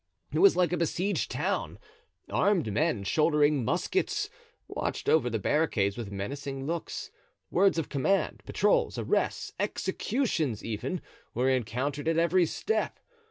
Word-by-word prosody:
It - - 0
was 395 0 +7
like 180 -1 +2
a - - +1
besieged 170 - 0
town. - - -2 0.5
Armed 180 - +1
men, 120 -3 +1
shouldering 150 +3 +3
muskets, 365 - 0 0.4
watched - - -3
over 140 -6 +4
the 115 - -1
barricades 105 -5 +1
with 115 -4 -6
menacing 135 +7 -4
looks; 165 +2 -4 0.4
words 195 -1 +4
of 165 - -1
command, 155 +8 0
patrols, - - +1
arrests, - - -1
executions, 160 - -1
even, 115 - -3 0.3
were 130 +3 +2
encountered 130 +5 -1
at 165 0 +2
every 170 +1 +3
step. 440 - -1
150 Hz, 130 wpm, -29 LUFS, 125-175 Hz, 0.5 s, was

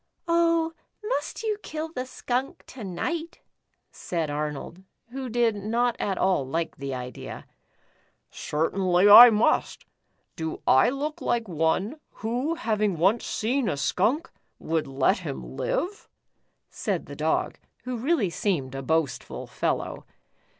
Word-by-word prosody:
"Oh, 335 -1 +2 0.3
must 455 +1 -3
you 425 -2 -1
kill 315 -2 -5
the 255 -5 -5
skunk 255 +1 -3
to 250 - -10
night?" 320 - -4 0.5
said 165 -4 -3
Arnold, 150 +4 -4 0.3
who 260 0 -5
did 235 -1 +2
not 230 +4 0
at 195 -2 -1
all 185 -6 +2
like 165 +5 -3
the 140 0 -5
idea. 125 0 -7 0.5
" - - -39 0.2
Certainly, 180 +4 +1
I 235 +4 +12
must. 215 0 +1 0.5
Do 160 -1 -5
I 130 - +5
look 300 +5 -4
like 235 -2 0
one, 185 - 0
who 250 +9 -2
having 215 - 0
once 195 +8 +2
seen 245 +2 0
a 145 - -2
skunk, 235 - 0 0.3
would 160 -1 -1
let 135 0 +2
him 65 -1 -6
live?" 395 - -2 0.6
said - - -2
the - - -9
Dog, - - -1 0.2
who 250 0 -4
really 240 - +1
seemed 155 -10 -1
a 135 - -4
boastful 160 0 -1
fellow. - - -3
215 Hz, 135 wpm, -26 LUFS, 160-270 Hz, 0.6 s, I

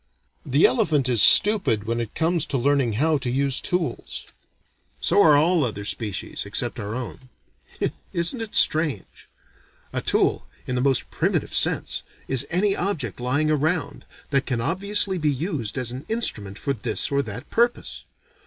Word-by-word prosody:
The - - +3
elephant 160 - +2
is 120 -4 +3
stupid 195 - +6
when 115 +2 -2
it 115 -2 -5
comes 165 0 0
to 135 - -1
learning 135 -2 +1
how 150 +6 +1
to 130 - -3
use 135 +1 +1
tools. 180 -2 -3 0.7
So 205 - +2
are 155 -6 +6
all 165 +2 +2
other 105 -5 -4
species 105 -3 -3
except - - -3
our 105 +2 -5
own. 130 +1 -8 0.8
Isn't 170 +9 0
it 225 -2 -7
strange? 155 - +1 0.6
A - - -2
tool, - - 0 0.2
in 125 - -4
the 125 - -1
most 135 -1 0
primitive - - -1
sense, - - +1 0.3
is 130 -2 +1
any 195 +3 +1
object, 150 - -3
lying 145 +5 0
around, 155 +3 -1 0.3
that 135 -2 +1
can 125 -3 -1
obviously 190 - +1
be 155 -1 +1
used 140 - -4
as 125 -2 -1
an 130 +3 -9
instrument 105 - -3
for 140 - -2
this 115 +2 -3
or 140 0 +2
that 115 +1 -8
purpose. 240 +1 -1
140 Hz, 160 wpm, -23 LUFS, 120-175 Hz, 0.8 s, stupid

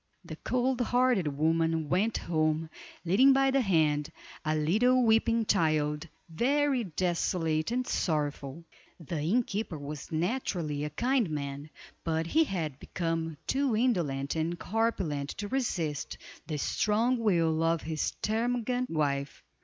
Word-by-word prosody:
The - - -7
cold 255 0 0
hearted 245 -7 +2
woman 160 0 +1
went 200 +8 +1
home, 155 -1 0 0.3
leading 255 +11 +6
by 270 0 +3
the 270 0 +3
hand 155 - +1 0.3
a 155 0 0
little 225 +12 +3
weeping 225 0 +3
child, 155 -3 +1 0.2
very 265 - +1
desolate 165 -2 0
and 250 +2 -1
sorrowful. 150 - -2 0.4
The 165 -1 -4
innkeeper 200 0 -1
was 145 0 -7
naturally 165 - -1
a 150 - -2
kind 240 - +1
man, 140 0 -5 0.3
but 160 0 0
he 320 - +3
had 160 - -3
become 165 -2 -3
too 270 -3 +1
indolent 165 - 0
and 165 +2 -1
corpulent 185 -10 -1
to 205 - -4
resist 175 - -2 0.3
the 155 -3 -3
strong 225 - +1
will 165 -7 +2
of 165 -1 +1
his 155 0 -1
termagant 245 +3 0
wife. 140 -3 -1
170 Hz, 130 wpm, -29 LUFS, 155-230 Hz, 0.4 s, leading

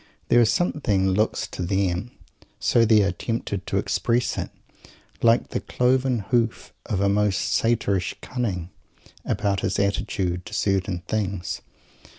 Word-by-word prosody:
There 120 - +6
is 115 - +4
something 125 - +1
that 95 - +2
looks 105 +3 +1
to - - -6
them 95 +3 0 0.5
so 115 -1 +3
they 110 -2 +5
are 100 - +1
tempted 100 0 -4
to - - 0
express 120 +1 0
it - - -3 0.7
like 115 0 +4
the - - -2
cloven 125 -3 +1
hoof 115 -3 0
of 95 - -1
a 100 - +3
most 100 -1 +1
Satyrish 100 -6 +1
cunning, 95 -9 -3 0.5
about 100 -1 0
his 95 - -1
attitude 95 -2 -1
to 105 - -6
certain 95 -3 0
things. 100 -5 -2
100 Hz, 145 wpm, -24 LUFS, 95-115 Hz, 0.7 s, There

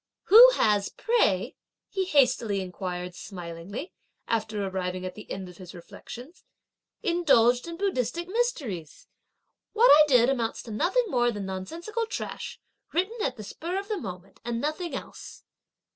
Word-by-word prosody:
"Who 470 +5 +11
has, 205 -2 +2
pray," 210 - +1 0.3
he 385 -1 -2
hastily 250 - +2
inquired 180 -1 -5
smilingly, 180 - -8 0.3
after 215 -2 -1
arriving 185 -1 -3
at 185 - -5
the 215 - -12
end 190 -1 -5
of 180 -1 -13
his 185 -1 -11
reflections, 240 - -11 0.6
"indulged 250 -7 +3
in 335 0 -6
Buddhistic 345 - -1
mysteries? 300 - -3 0.7
what 465 +3 +6
I 305 +1 +8
did 250 -4 +5
amounts 240 -4 -1
to 230 - -9
nothing 385 - +1
more 240 -6 +2
than 205 -3 -5
nonsensical 335 - -4
trash, - - -6 0.3
written, 405 +7 -1
at 260 -7 -1
the 215 - -7
spur 340 - -5
of 400 +2 -5
the 425 - -1
moment, 185 - -9
and 235 -1 -2
nothing 310 +2 -3
else." - - -9
240 Hz, 145 wpm, -27 LUFS, -, 0.7 s, Who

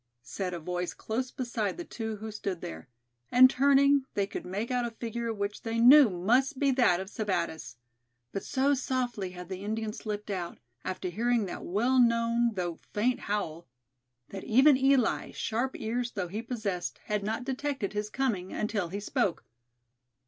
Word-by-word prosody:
said 185 +7 -4
a 175 - -4
voice 180 +2 -3
close 250 +4 -3
beside 235 -6 -3
the 345 - -6
two 220 -5 -4
who 215 +1 -7
stood 200 -4 -4
there; 80 - -8 0.4
and 255 +1 +8
turning, 280 +1 +4
they 200 - +2
could 195 - -7
make 205 +7 -3
out 250 -1 +1
a 240 - -1
figure 230 0 -4
which 200 -1 -3
they 225 0 -3
knew 255 +2 +8
must 240 +10 +1
be 275 0 +3
that 235 -9 +3
of 190 - -5
Sebattis; 170 - -3 0.6
but 195 - -4
so 275 +2 +2
softly 250 -7 -1
had 180 -1 -9
the 190 +1 -6
Indian 220 +1 -2
slipped 210 -1 -5
out, 175 -3 -4 0.3
after 185 0 -3
hearing 230 +3 +1
that 180 - -6
well 240 +8 +2
known 230 -1 +3
though 175 -3 -3 0.2
faint 245 +4 +2
howl, 175 -7 -3 0.6
that 195 -1 -7
even 265 +6 +6
Eli, 265 -2 +2
sharp 240 +4 -2
ears 235 +2 -2
though 180 -3 -3
he 210 +5 -4
possessed, 215 -7 -3
had 210 -1 -1
not 220 +4 -2
detected 265 -4 -2
his 210 0 -2
coming 215 -8 -1
until 210 -4 -1
he 195 +4 -5
spoke. 200 -3 -1
220 Hz, 170 wpm, -29 LUFS, 195-250 Hz, 0.6 s, and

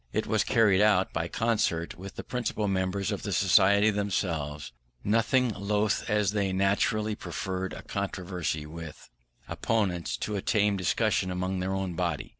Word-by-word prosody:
It - - -1
was - - +1
carried 105 -4 +4
out 105 -3 +3
by 85 +1 -1
concert 105 -7 0
with 95 +2 -9
the - - -6
principal 120 -4 -2
members 95 0 -1
of - - -3
the - - -4
Society, 100 +3 +4
themselves 85 -8 -2 0.3
nothing 115 +4 +2
loth, 105 +1 -1
as 105 -2 +2
they 100 -2 0
naturally 100 +3 +1
preferred 95 -1 -4
a - - -8
controversy 90 -5 -3
with 80 -3 -10 0.4
opponents 95 -7 -1
to 105 - -3
a 100 - -2
tame 105 0 +2
discussion 95 +1 +1
among 95 +1 -2
their 95 +1 -1
own 95 -2 -2
body. - - -2
95 Hz, 155 wpm, -28 LUFS, 90-105 Hz, 0.4 s, carried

